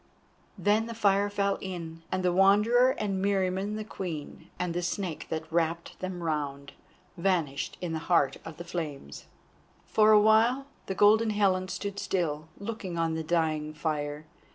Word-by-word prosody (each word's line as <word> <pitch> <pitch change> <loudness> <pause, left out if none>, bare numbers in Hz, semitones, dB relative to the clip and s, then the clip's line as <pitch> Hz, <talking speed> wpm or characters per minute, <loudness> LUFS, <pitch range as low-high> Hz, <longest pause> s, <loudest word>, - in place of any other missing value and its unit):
Then 215 +2 +2
the 230 - -6
fire 205 -2 +3
fell 200 -1 0
in, 165 -3 -6
and 185 0 -1
the 180 - +3
Wanderer 215 +7 +5
and 195 -3 -1
Meriamun 195 +1 0
the 215 - -4
Queen, 175 -8 -7
and 180 -2 -2
the 175 - -1
Snake 175 -1 -3
that 160 0 -2
wrapped 165 0 -1
them 185 -2 -5
round, 140 -3 -3 0.5
vanished 170 -6 0
in 175 -2 -3
the 160 - -1
heart 140 -6 +3
of 160 -2 -9
the 175 - -6
flames. 150 - -6 0.6
For 215 0 +4
awhile 220 +5 +5 0.2
the 190 - -2
Golden 220 +3 +5
Helen 195 -3 +2
stood 200 +1 -4
still, 155 -4 -1
looking 200 -4 -5
on 165 -1 +1
the 160 - -2
dying 155 -2 0
fire. 150 -1 -3
185 Hz, 155 wpm, -28 LUFS, 160-205 Hz, 0.6 s, Wanderer